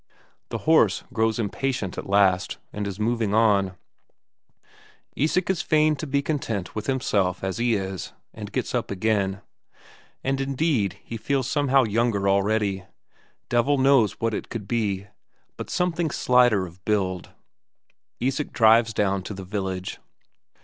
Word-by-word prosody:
The - - -3
horse 155 -11 +4
grows 110 -2 +1
impatient 115 -1 -2
at - - -7
last 95 -2 +3 0.2
and 105 -1 -3
is 100 0 -6
moving 110 -2 0
on; 100 -4 +3 1.4
Isak 160 +5 +1
is 180 -3 -1
fain 155 0 +3
to 155 - -5
be 140 +1 0
content 115 - -3
with 110 0 -5
himself 100 -9 0
as 95 +3 -2
he 120 -1 +2
is, 95 -2 -4 0.2
and - - -8
gets - - -2
up - - -1
again. 100 -1 0 0.8
And 135 0 0
indeed 135 - 0
he 115 - -6
feels 130 +3 -1
somehow 140 -3 +3
younger 110 -2 +1
already 100 -1 +1 0.6
devil 120 +4 +2
knows 130 -6 +4
what 115 -1 -2
it - - -4
could 105 -4 -6
be, 100 -4 -1 0.5
but - - -7
somehow 175 -2 0
slighter 125 -8 +3
of 90 +1 -14
build. 95 -4 -1 0.9
Isak 135 +3 -1
drives 115 0 +4
down 100 -1 +1
to 100 +2 -7
the 95 0 -8
village. 95 -2 -4
110 Hz, 140 wpm, -24 LUFS, 100-130 Hz, 1.4 s, horse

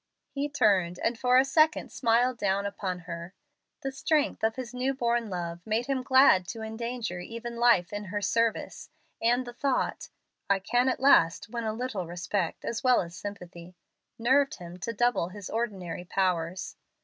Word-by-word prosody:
He 285 +1 -2
turned, 195 -10 +2
and 230 +5 0
for 250 +2 +3
a 260 - +5
second 310 +3 +2
smiled 240 0 +2
down 200 0 0
upon 185 -3 -4
her. 170 +1 -8 0.5
The 270 - -2
strength 295 +1 0
of 220 0 +2
his 250 -2 -6
new 260 +2 -1
born 235 -3 0
love 175 -2 -4
made 220 +4 -1
him 270 -1 -1
glad 260 -9 +5
to 225 +2 -6
endanger 220 -3 -4
even 230 +5 -7
life 235 -7 +3
in 205 0 -4
her 205 +2 -3
service, 230 +2 -1 0.3
and 245 +2 +2
the 240 - -8
thought, 270 +2 -1 0.4
"I 200 - +4
can 245 +6 +1
at - - -1
last 220 -8 +4
win 235 0 -4
a 220 - 0
little 220 -6 -4
respect, 175 +1 -3
as 230 - -3
well 255 -1 +5
as 170 0 -8
sympathy," 180 -3 -9 0.4
nerved 270 +4 +3
him 175 0 -10
to 215 +6 -3
double 235 -6 +1
his 200 0 -9
ordinary 190 -7 -3
powers. 180 -2 -1
225 Hz, 175 wpm, -28 LUFS, 185-250 Hz, 0.5 s, a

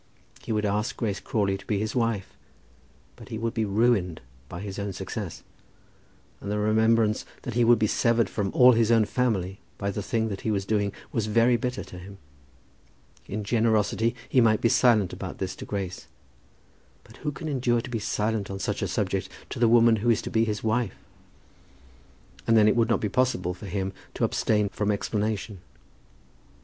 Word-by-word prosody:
He - - -6
would 105 -1 0
ask 105 +2 -1
Grace 105 -4 -2
Crawley 100 -3 -1
to - - -14
be 105 - 0
his 110 +4 -2
wife; 115 -5 -1 0.8
but - - -13
he 110 - -4
would 115 +1 -2
be 110 -3 0
ruined 100 -5 +1 0.3
by 90 - -7
his 100 0 -6
own 100 -1 -3
success. 95 0 -6 1.0
And 100 - -7
the 105 - 0
remembrance 110 +1 +2 0.2
that 125 - -4
he 120 +1 +3
would 120 0 +6
be 110 - +2
severed 115 +1 +2
from 100 -1 -2
all 125 0 +7
his 115 -1 +3
own 115 -2 +5
family 100 -6 -1 0.2
by 100 0 -2
the 105 - -4
thing 110 +2 -1
that 100 -2 -5
he - - -2
was 100 -2 0
doing, 100 -1 0 0.2
was 110 -3 -1
very 115 +3 +4
bitter 125 +2 -2
to 90 - -11
him. 100 +2 -11 1.1
In 105 +2 -4
generosity 110 +1 +1
he 130 - +3
might 110 -2 +4
be 115 - +2
silent 110 -6 +3
about - - -6
this 95 -1 -4
to - - -7
Grace, 95 -3 -5 1.0
but - - -17
who 150 - -3
can 150 +3 -7
endure 125 -5 +1
to 125 - -8
be 115 - -1
silent 105 -1 -1
on 95 - -4
such - - -2
a - - 0
subject - - -1 0.2
to - - -5
the 115 -1 +4
woman 115 -1 +5
who 115 +4 0
is 115 - +2
to - - -5
be 115 0 +3
his 105 -2 -3
wife? 110 -2 0 1.5
And 115 - +5
then 105 -1 +6
it 110 - +4
would 115 0 +2
not 115 - +2
be 105 - -1
possible 100 -8 0
for 90 +3 -10
him 95 0 -3 0.2
to - - -2
abstain 105 -2 +1
from 105 +1 -2
explanation. 105 -1 -2
110 Hz, 195 wpm, -26 LUFS, 100-115 Hz, 1.5 s, all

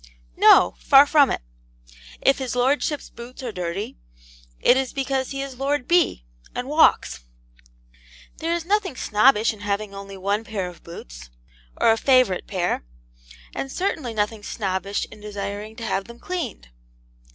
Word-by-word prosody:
No; 90 - +6
far 275 +1 +7
from 290 -2 +5
it. - - -3 0.8
If 275 - +3
his 255 -2 -3
lordship's 275 +4 0
boots 245 +2 -10
are 245 - -3
dirty, 180 - -5 0.6
it - - +5
is 265 -1 -1
because 270 -1 -1
he 275 0 -3
is 265 -2 -9
Lord 275 -1 -1
B., 340 - +2 0.3
and 250 +1 -3
walks. 305 - +3 1.2
There 335 +1 -1
is 340 -1 -4
nothing 390 -5 0
snobbish 220 0 +3
in 215 - -14
having 205 0 -3
only 195 0 -9
one 200 +3 -1
pair 205 -4 -4
of 175 -1 -11
boots, - - -11 0.5
or - - +5
a 225 - +2
favourite 255 -8 +3
pair; 180 - -1 0.7
and 270 - -4
certainly 300 - -2
nothing 210 +1 -1
snobbish 195 -1 -2
in 210 - -13
desiring 205 +1 -6
to 230 -1 -7
have 195 -2 -1
them 235 0 -12
cleaned. 340 - -5
225 Hz, 150 wpm, -23 LUFS, 200-275 Hz, 1.2 s, far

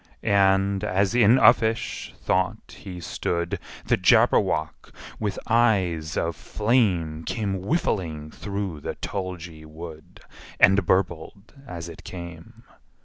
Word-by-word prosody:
And, 100 0 +3
as 100 0 +1
in 120 0 +5
uffish 115 -3 +3
thought 95 +4 -1
he 90 -4 -8
stood, 85 0 -3 0.3
The - - +2
Jabberwock, 80 0 +2 0.3
with 105 -2 -2
eyes 95 -10 +2
of 85 -1 -1
flame, 95 -9 0
Came 100 -2 -2
whiffling 85 - -2
through 100 -5 -5
the - - -5
tulgey 90 -5 -6
wood, 80 0 -11 0.4
And 95 -1 +5
burbled 95 +2 -1
as 85 -1 -6
it 85 - -11
came! 85 -2 -10
95 Hz, 110 wpm, -24 LUFS, 85-100 Hz, 0.4 s, in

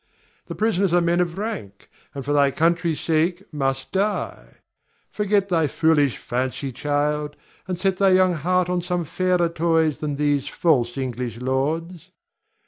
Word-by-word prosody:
The - - -6
prisoners 200 -4 +1
are 175 - +5
men 170 0 +1
of 175 0 -1
rank, 195 - -6 0.3
and 140 - -5
for 145 - 0
thy 140 -1 +4
country's 165 +2 +1
sake 170 +3 0
must 135 -2 -2
die. 200 +2 -2 0.6
Forget 205 -1 +1
thy 165 -4 +2
foolish 145 -3 +2
fancy, 130 +2 -3
child, 145 +2 -1 0.3
and 185 -1 -2
set 190 +1 0
thy 195 0 +4
young 185 -1 +4
heart 180 +3 +1
on 180 0 0
some 180 -1 -2
fairer 180 +1 +1
toys 165 -2 +1
than 150 -2 -2
these 145 -1 0
false 125 -7 +1
English 125 -3 -4
lords. 150 +7 -2
160 Hz, 150 wpm, -23 LUFS, 140-180 Hz, 0.6 s, are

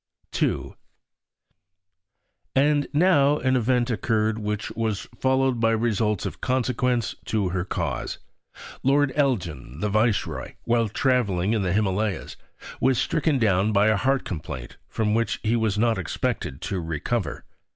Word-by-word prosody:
II - - 0 1.8
And 145 +1 +3
now 150 -3 +4
an 130 -2 +1
event 125 0 +1
occurred 110 -1 0
which 105 -1 -3
was 110 -3 -2 0.2
followed 130 -2 +2
by 115 0 +3
results 110 -3 0
of - - -5
consequence 125 -2 0
to 105 -4 0
her 90 0 -1
cause. - - -3 0.6
Lord 140 0 +3
Elgin, 85 - -1
the 105 - -1
Viceroy, 110 +1 0
while 115 -2 +1
travelling 105 -6 +1
in 110 - +1
the 90 -2 0
Himalayas, 100 0 -1 0.4
was 130 -1 +3
stricken 155 0 +1
down 105 -3 +2
by 100 +2 +4
a 110 - +3
heart 135 +5 +1
complaint 75 -7 -6
from 105 -1 0
which 115 +1 0
he 110 +2 +2
was 110 -3 0
not 115 -1 +2
expected 70 -5 -3
to 95 - -2
recover. 80 +3 -3
110 Hz, 135 wpm, -25 LUFS, 100-130 Hz, 1.8 s, now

